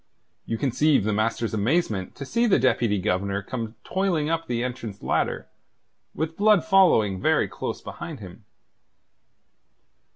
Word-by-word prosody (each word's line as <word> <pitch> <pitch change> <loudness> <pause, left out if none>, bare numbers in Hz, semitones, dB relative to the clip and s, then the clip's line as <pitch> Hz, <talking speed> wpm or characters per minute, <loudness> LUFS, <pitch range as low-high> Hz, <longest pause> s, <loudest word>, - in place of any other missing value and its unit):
You 115 - -2
conceive 140 +1 +2
the 105 +1 0
master's 110 +2 -1
amazement 110 - 0
to 140 - -7
see 235 - +1
the 200 - +4
Deputy 115 -4 +2
Governor 100 +1 -1
come 115 +1 -5
toiling 175 -5 0
up 165 0 -2
the 120 -1 -1
entrance 120 -5 -6
ladder, - - -1 0.7
with 160 +1 -3
Blood 210 -3 +4
following 140 - +4
very - - +2
close - - -5
behind 165 -4 -7
him. 95 +1 -11
120 Hz, 135 wpm, -25 LUFS, 105-165 Hz, 0.7 s, the